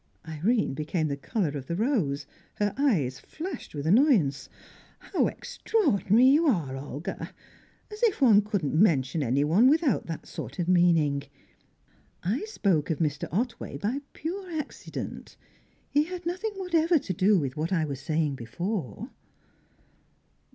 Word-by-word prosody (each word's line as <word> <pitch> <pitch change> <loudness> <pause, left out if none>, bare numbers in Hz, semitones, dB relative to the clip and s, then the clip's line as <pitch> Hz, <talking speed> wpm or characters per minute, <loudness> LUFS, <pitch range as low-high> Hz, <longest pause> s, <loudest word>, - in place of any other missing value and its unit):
Irene 180 - 0
became 155 +2 -1
the 140 - -1
colour 170 +5 -1
of 135 -2 -6
the 170 - -2
rose; 180 - 0 0.3
her 205 -1 0
eyes 175 - +1
flashed 340 - -7
with 145 0 -4
annoyance. 185 - +3 0.5
"How - - 0
extraordinary 255 - +1
you 295 +5 +5
are, 165 - +1
Olga! 145 +3 -6 0.6
As 420 +2 -9
if 460 -5 +2
one 225 -7 +6
couldn't 200 -8 -2
mention 155 -4 +3
anyone 145 - +3
without 300 - +2
that 165 -2 -6
sort - - -7
of 175 -2 -1
meaning! 165 -6 +3 1.0
I 220 - -1
spoke 195 - 0
of 160 - 0
Mr. 150 -3 -1
Otway 230 - -2
by 240 +8 -2
pure 370 +4 -5
accident. 305 -3 -6 0.5
He 295 +1 +3
had 355 0 -7
nothing 370 +5 -2
whatever 340 -3 +2
to 200 -9 -3
do 195 +4 +4
with 135 -6 -2
what 155 +3 -2
I 165 -4 +2
was 140 -3 -5
saying 155 +1 0
before." 135 - -4
185 Hz, 140 wpm, -27 LUFS, -, 1.0 s, one